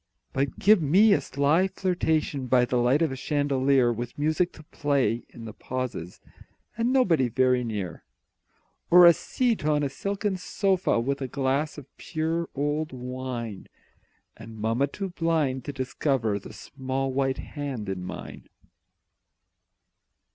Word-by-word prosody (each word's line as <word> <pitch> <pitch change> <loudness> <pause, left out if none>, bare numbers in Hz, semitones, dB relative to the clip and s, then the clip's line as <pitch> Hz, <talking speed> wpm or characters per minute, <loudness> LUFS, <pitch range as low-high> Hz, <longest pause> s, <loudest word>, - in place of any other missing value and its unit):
But 135 0 -1
give 210 -2 +5
me 195 +9 +5
a - - +2
sly 150 +7 +2
flirtation 160 -8 -1
By 125 0 +4
the 125 - -1
light 125 +6 +3
of 160 - 0
a - - -4
chandelier 135 -3 +2
With 120 +1 -6
music 155 +4 +1
to 155 - -13
play 140 -6 0
in 115 - -11
the 110 - -7
pauses, 125 -11 -5 0.6
And 230 +3 0
nobody 180 - +3
very 125 +1 +2
near; 105 -7 -5 0.9
Or 180 0 +9
a 170 - +9
seat 235 - -1
on 150 -1 +2
a 140 - 0
silken 200 +6 -2
sofa, 190 - +1
With 140 +4 -2
a 135 - -2
glass 140 +4 -1
of 145 - -9
pure 165 +1 -2
old 145 +2 -1
wine, 125 -4 -5 0.7
And 110 0 -11
mamma 115 +6 +1
too 195 +7 -5
blind 160 -7 0
to - - -3
discover 130 -5 -1
The - - -11
small 135 0 -4
white 135 0 0
hand 140 -8 -5
in 95 -2 -4
mine. 90 - -8
140 Hz, 145 wpm, -26 LUFS, 125-160 Hz, 0.9 s, Or